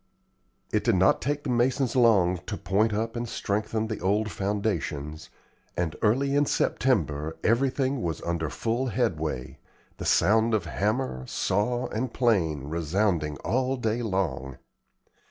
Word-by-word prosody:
It - - +2
did - - +3
not 95 +1 +4
take 145 +3 -1
the 130 - -2
masons 125 +1 +1
long 100 -8 +4
to 105 - -3
point 105 +3 +1
up 115 +2 -2
and 120 0 -3
strengthen 110 +2 -1
the 110 -1 -4
old 105 +3 0
foundations, 90 -7 -3 0.5
and 85 -3 -1
early 135 +6 +2
in 145 0 +3
September 80 - 0
everything 130 +2 +1
was 80 -5 -2
under 85 -3 -1
full 120 +8 -1
headway, 65 - -2 0.4
the - - -6
sound 110 +2 +3
of 100 -6 -1
hammer, 100 - -1
saw, 120 +6 0
and 120 +3 -2
plane 90 - +1
resounding 80 0 0
all 130 +2 +1
day 115 0 -1
long. 95 - -2
105 Hz, 135 wpm, -27 LUFS, 85-120 Hz, 0.5 s, not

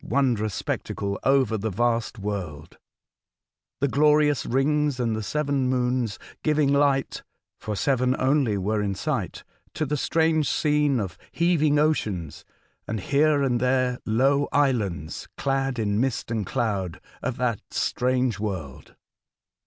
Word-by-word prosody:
wondrous 115 -7 0
spectacle 100 0 -3
over 130 -6 +2
the 110 +2 -2
vast 115 +3 0
world, 95 -7 -5 1.0
the 140 - +3
glorious 150 -1 +3
rings 145 +1 +1
and 115 -3 0
the 110 - -3
seven 140 +1 0
moons 125 -4 0 0.2
giving 150 -2 +2
light 140 -1 +1 0.4
(for 105 - -4
seven 130 +2 +1
only 130 -5 +2
were 105 +3 0
in 100 -1 -1
sight) 110 - -3 0.3
to 155 - -1
the 150 +1 -1
strange 160 +1 +1
scene 150 -3 +2
of 95 -6 -5
heaving 160 -4 +2
oceans, 105 - -1 0.4
and 110 0 -2
here 145 +6 +2
and 125 -3 +1
there 125 0 +1
low 135 +6 +2
islands 105 - 0
clad 135 -1 -1
in 105 -2 0
mist 130 -3 -2
and 110 -3 -2
cloud, 100 -8 -2 0.2
of 125 0 -3
that 120 -4 -1
strange 125 -3 0
world. 90 -11 -5
125 Hz, 130 wpm, -25 LUFS, 105-140 Hz, 1.0 s, the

